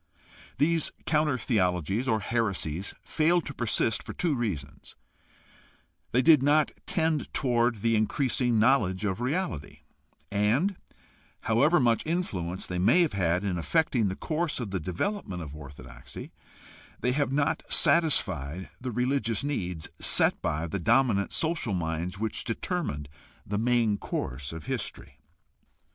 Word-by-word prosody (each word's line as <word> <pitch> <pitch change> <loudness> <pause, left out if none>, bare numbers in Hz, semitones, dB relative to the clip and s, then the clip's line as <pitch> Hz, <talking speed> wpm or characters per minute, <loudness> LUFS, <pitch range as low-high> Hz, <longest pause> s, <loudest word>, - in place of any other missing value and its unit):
These 165 +1 +1
counter 150 -4 +2
theologies 95 - 0
or 110 -4 +1
heresies 100 -6 -2
failed 165 +2 +2
to 145 - -5
persist 115 -3 0
for - - -8
two 170 -4 0
reasons: 100 - -4 1.2
they 125 +2 +3
did 155 -4 +7
not 145 +2 +3 0.2
tend 160 -3 0
toward 120 -5 +1
the 115 -1 +3
increasing 120 +2 +1
knowledge 110 -5 +2
of 95 +3 -2
reality; 130 - -3 0.5
and, 115 - +1 0.7
however 140 +10 +3
much 115 -3 +2
influence 95 - -3
they 90 -1 -3
may 135 - +5
have 165 -9 +1
had 90 -1 +1
in 95 -4 -1
affecting 125 - +1
the 95 - -2
course 160 - -2
of 115 -6 -4
the 95 - -1
development 90 - -3
of 75 -1 -8
orthodoxy, 65 -4 -10 0.7
they 125 - +1
have 140 0 0
not 140 +1 +1
satisfied 90 - +3
the 130 - -4
religious 125 -2 0
needs 90 - -3
set - - +4
by 75 +2 -1
the 90 +4 -3
dominant 115 0 +2
social 160 - 0
minds 85 +2 -3
which 110 +1 -3
determined 115 - -3 0.4
the 105 +1 -2
main 115 -3 +2
course 65 +3 -4
of 80 -1 -7
history. 70 0 -5
115 Hz, 135 wpm, -28 LUFS, 90-140 Hz, 1.2 s, did